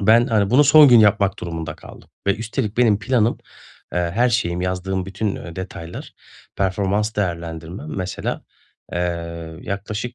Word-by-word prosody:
Ben, 115 +4 +5
hani, 105 -3 +1
bunu 140 +5 +6
son 145 +1 +8
gün 120 -2 +8
yapmak 105 -2 +3
durumunda 80 -2 -5
kaldım - - -14 0.2
ve 100 - +2
üstelik 110 -1 -3
benim 110 -5 +4
planım, 115 0 +1 0.6
eee, - - +1 0.2
her 120 +3 +3
şeyim, 90 -7 0
yazdığım 95 +1 -2
bütün, 100 +1 -2
eee, 85 -1 -9
detaylar, 90 -2 -7 0.4
performans 100 +3 0
değerlendirmem, 85 -3 -4
mesela, 95 -1 -3 0.5
eee, 85 -2 -4
yaklaşık 105 +4 -4
100 Hz, 140 wpm, -21 LUFS, 90-110 Hz, 0.6 s, son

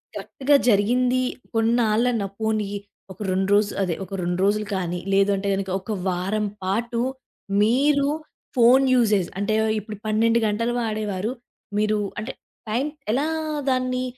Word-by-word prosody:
కరెక్ట్‌గా 285 +2 +1
జరిగింది 245 +5 +3 0.3
కొన్నాళ్ళన్న, 225 0 +2 0.2
పోనీ 220 -2 0 0.4
ఒక 185 - -26
2 190 +1 0
రోజులు, 205 0 +1
అదే 175 -3 -1
ఒక 195 - -12
2 175 +1 -1
రోజులు 210 +1 +1
కానీ 180 -1 -2
లేదు 195 +1 +4
అంటే 200 +1 -3
గనక 195 0 -3
ఒక 220 - -6 0.2
వారం 195 +4 -1 0.2
పాటు 230 +5 -1 0.6
మీరు 280 +5 +3 0.5
ఫోను 255 +2 +6
యూజేజ్ 210 -7 +3
అంటే 205 +2 0 0.3
ఇప్పుడు 210 +1 -8
12 225 +2 +3
గంటలు 230 +3 0
వాడేవారు, 215 -2 -2 0.5
మీరు 215 0 +2 0.2
అంటే, 220 +5 -4 0.4
టైం 240 +6 0 0.3
ఎలా 275 +5 +1 0.4
దాన్ని 255 -1 0
215 Hz, 130 wpm, -23 LUFS, 200-240 Hz, 0.6 s, ఫోను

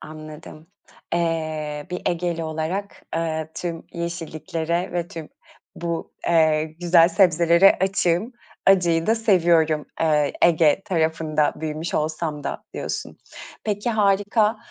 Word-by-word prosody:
anladım. 155 0 -11 0.5
Eee, 155 -3 -2
bir 180 - -4
Egeli 170 -1 -1
olarak, 160 +6 -4
eee, 160 -1 -2
tüm 170 -2 -5
yeşilliklere 170 0 -3
ve 175 -1 -2
tüm 160 -3 -8 0.5
bu, 170 -1 -4
eee, 155 -2 +3 0.2
güzel 170 -1 +5
sebzelere 175 0 +4
açığım. 190 +3 +1 0.3
Acıyı 175 -4 +4
da 225 - +4
seviyorum, 170 -8 +2
eee, 150 -3 +2
Ege 165 +1 +4
tarafında 160 -3 0
büyümüş 155 +1 -4
olsam 155 -1 -2
da - - -4
diyorsun. - - -5 0.5
Peki, 210 +2 -1
harika. 210 +1 +2
165 Hz, 110 wpm, -23 LUFS, 155-180 Hz, 0.5 s, güzel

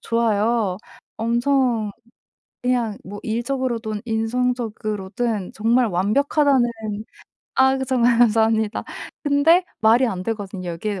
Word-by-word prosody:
좋아요. 225 -3 +1 0.4
엄청 235 -1 +1 0.7
그냥 240 -4 0
뭐 205 +2 -8
일적으로든 235 -2 -2
인성적으로든 225 -3 -2
정말 235 +3 +2
완벽하다는 260 - +2 0.9
아 265 0 +4
정말 245 -2 +2
감사합니다. 220 -1 +2 0.4
근데 310 +5 +4 0.2
말이 230 +4 +5
안 185 -3 -4
되거든요. 195 -5 -4
여기에 195 +4 -4
230 Hz, 250 characters per minute, -22 LUFS, 210-250 Hz, 0.9 s, 말이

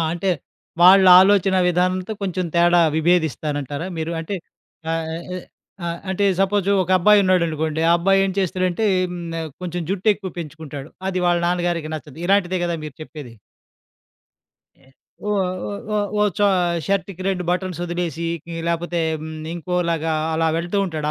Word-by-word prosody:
అంటే 180 +3 -1 0.5
వాళ్ళ 190 +2 +8 0.2
ఆలోచన 195 -1 +4
విధానంతో 185 +3 0
కొంచెం 185 -1 -2
తేడా 175 0 +5 0.2
విభేదిస్తానంటారా 155 -2 0
మీరు? 160 +1 -3
అంటే 180 +5 -5 0.6
ఆహ్, 165 -1 -2 0.8
ఆహ్, 170 0 -3
అంటే 200 +2 0 0.2
సపోజు 195 0 +1
ఒక 180 - -5
అబ్బాయి 210 +2 +5
ఉన్నాడనుకోండి. 160 -4 +1
ఆ - - +6
అబ్బాయి 195 +2 +3
ఏం 190 - -2
చేస్తాడంటే 185 +2 0 0.2
హ్మ్, 180 - -6 0.2
ఆహ్, 160 -1 -5
కొంచెం 175 0 -3
జుట్టెక్కువ 195 0 0
పెంచుకుంటాడు. 150 -3 -8 0.2
అది 185 -1 -1
వాళ్ళ 175 0 +3
నాన్నగారికి 175 -3 -1
నచ్చదు. 150 -1 -11
ఇలాంటిదే 185 -1 +2
గదా! 170 -1 -1
మీరు 145 - -10
చెప్పేది. 145 -7 -10 1.4
ఎ 135 - -26 0.4
ఓహ్! 200 -3 +1 0.5
ఓహ్! 205 -1 0
ఓహ్! 210 - +3
చొ - - +1 0.4
షర్ట్‌కి 195 -2 -2
2 180 -2 -1
బటన్స్ 180 -1 -2
వదిలేసి 170 -2 -3 0.4
లేపోతే 170 0 -1 0.2
హ్మ్. 160 - -7 0.2
ఇంకోలాగా 170 -2 -1 0.2
అలా 165 0 +1
వెళ్తూ 175 +4 -2
ఉంటాడు 155 -3 -4
175 Hz, 135 wpm, -21 LUFS, 160-190 Hz, 1.4 s, వాళ్ళ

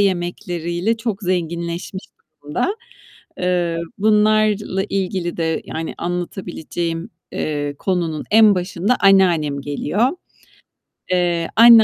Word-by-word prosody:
yemekleriyle 175 +1 -1
çok 225 -2 -3
zenginleşmiş 170 +1 -2 0.4
durumda. 150 - -1 0.6
Eee, 175 -2 0 0.2
bunlarla 210 -2 +3
ilgili 185 -3 -2
de, 160 -1 -1
yani, 160 0 -5
anlatabileceğim, 175 -1 -4 0.2
eee, 145 -1 -2
konunun 170 -5 -1
en 215 -1 +7
başında 185 +5 0
anneannem 175 -8 +4
geliyor. 150 - 0 1.0
Eee, 175 -2 +1
anne 230 0 +9
180 Hz, 90 wpm, -20 LUFS, 170-200 Hz, 1.0 s, anne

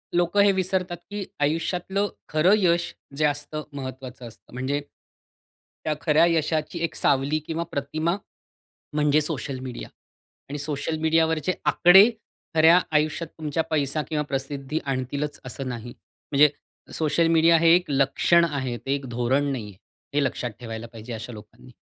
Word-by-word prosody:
लोकं 175 +3 +3
हे 200 - +5
विसरतात 185 -1 -1
की 205 -1 -3 0.2
आयुष्यातलं 175 +6 0 0.2
खरं 155 +6 +4
यश 175 -3 +1 0.2
जे 155 - +2
असतं, 145 +1 -2
महत्वाचं 130 -2 -7
असतं. 115 - -17
म्हणजे 130 +3 -1 1.1
त्या 155 - +1
खऱ्या 160 0 +4
यशाची 160 0 0
एक 165 - -2
सावली 140 +3 +1
किंवा 165 +1 -2
प्रतिमा, 155 +5 -1 0.8
म्हणजे 150 0 +3
सोशल 140 -4 -3
मीडिया 130 -2 -7 0.6
आणि 145 - -4
सोशल 150 +2 -2
मीडियावरचे 160 +1 +2
आकडे 190 +5 +7 0.5
खऱ्या 160 +2 +7
आयुष्यात 155 +2 +1
तुमच्या 155 0 -1
पैसा 150 0 0
किंवा 150 -2 0
प्रसिद्धी 140 +2 -3
आणतीलच 140 +2 -3
असं 130 +1 -5
नाही. 120 0 -6 0.4
म्हणजे 150 +1 +6 0.4
सोशल 160 +1 +2
मीडिया 165 0 +5
हे 165 0 +6
एक 180 0 +1
लक्षण 140 +5 +3
आहे 130 -5 -3
ते 135 +3 -2
एक 140 -1 -6
धोरण 130 +4 +1
नाही 125 -6 -4
आहे, 95 - -19 0.4
हे 145 - +3
लक्षात 125 -3 -2
ठेवायला 115 -1 -6
पाहिजे 115 +2 -8
अशा 110 +2 -7
लोकांना. 110 +4 -14
150 Hz, 145 wpm, -25 LUFS, 135-165 Hz, 1.1 s, आकडे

